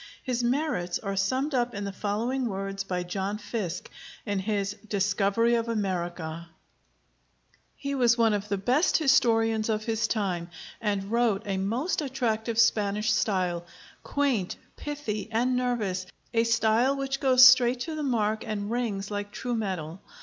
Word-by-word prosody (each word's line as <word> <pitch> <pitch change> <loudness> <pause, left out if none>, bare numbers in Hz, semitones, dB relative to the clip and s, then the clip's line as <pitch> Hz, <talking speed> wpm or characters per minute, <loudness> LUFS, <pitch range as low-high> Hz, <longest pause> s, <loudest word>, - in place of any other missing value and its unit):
His 245 -2 -1
merits 240 - 0
are 195 -2 -4
summed 260 +10 0
up 245 -2 0
in 205 - -3
the 200 - -3
following 230 +6 -1
words 195 -1 -3
by 180 -2 -2
John 195 +3 -3
Fiske, 205 -4 -4 0.4
in 205 -1 -1
his 200 0 -1
'Discovery 200 +3 +2
of 230 0 0
America': 175 -6 -3 1.3
"He 280 0 -4
was 240 -3 +3
one 225 -2 +4
of 205 0 -2
the 200 - 0
best 255 - +2
historians 225 -6 +3
of 215 -1 0
his 225 0 0
time, 185 -7 -2 0.3
and 200 -2 -1
wrote 230 -3 +2
a 195 -2 -1
most 235 - -1
attractive 230 -5 -1
Spanish 210 -1 +3
style, 185 -5 0 0.4
quaint, 265 -10 0 0.2
pithy, 255 -8 -4
and 245 +3 +1
nervous, 215 -7 -1 0.3
a 230 0 +3
style 230 +3 +3
which 275 0 -2
goes 255 -2 +7
straight 255 -1 +6
to 320 +4 -3
the 310 - -4
mark 220 -6 0
and 210 -2 -4
rings 215 -5 -2
like 205 0 -4
true 245 +2 -4
metal. 185 -6 -4
220 Hz, 150 wpm, -27 LUFS, 195-245 Hz, 1.3 s, goes